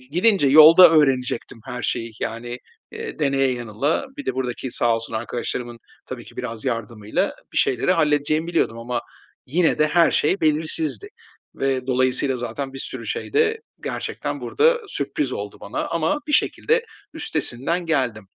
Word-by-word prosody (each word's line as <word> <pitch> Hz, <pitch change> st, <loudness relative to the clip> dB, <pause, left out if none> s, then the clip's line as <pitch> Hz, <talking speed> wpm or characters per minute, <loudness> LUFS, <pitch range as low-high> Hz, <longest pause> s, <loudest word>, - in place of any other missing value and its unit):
gidince 175 Hz, -, +2 dB
yolda 155 Hz, +5 st, +9 dB
öğrenecektim 130 Hz, -6 st, +1 dB
her 125 Hz, -1 st, -5 dB
şeyi. 115 Hz, -1 st, -2 dB
Yani, 120 Hz, +2 st, -4 dB, 0.3 s
eee, -, -, -7 dB
deneye 135 Hz, -2 st, +2 dB
yanıla, 120 Hz, -, -1 dB
bir 285 Hz, -, -7 dB
de -, -, -1 dB
buradaki 130 Hz, 0 st, -3 dB
sağ 115 Hz, -1 st, +2 dB
olsun 115 Hz, -, -6 dB
arkadaşlarımın 120 Hz, +1 st, -4 dB, 0.3 s
tabii -, -, -7 dB
ki, -, -, -15 dB
biraz 115 Hz, 0 st, -5 dB
yardımıyla 115 Hz, -3 st, -2 dB, 0.2 s
bir -, -, 0 dB
şeyleri 130 Hz, +8 st, +2 dB
halledeceğimi 155 Hz, 0 st, +1 dB
biliyordum 165 Hz, -9 st, 0 dB
ama 120 Hz, +1 st, -3 dB, 0.5 s
yine 165 Hz, +5 st, +2 dB
de 155 Hz, -, +4 dB
her 165 Hz, +1 st, +4 dB
şey 185 Hz, +7 st, +1 dB
belirsizdi. 155 Hz, -4 st, 0 dB, 0.5 s
Ve 135 Hz, -1 st, -1 dB
dolayısıyla 130 Hz, +1 st, +1 dB
zaten 135 Hz, +3 st, -5 dB
bir 135 Hz, -, -8 dB
sürü -, -, -5 dB
şey -, -, -4 dB
de 445 Hz, +1 st, +2 dB, 0.2 s
gerçekten -, -, -4 dB
burada 475 Hz, +3 st, +2 dB
sürpriz 140 Hz, -, -2 dB
oldu 100 Hz, 0 st, -5 dB
bana 100 Hz, -, -4 dB
ama 170 Hz, -, 0 dB
bir 300 Hz, -, -3 dB
şekilde 465 Hz, +9 st, +2 dB, 0.3 s
üstesinden 170 Hz, -, -2 dB
geldim. 125 Hz, -9 st, 0 dB
135 Hz, 150 wpm, -22 LUFS, 120-165 Hz, 0.5 s, yolda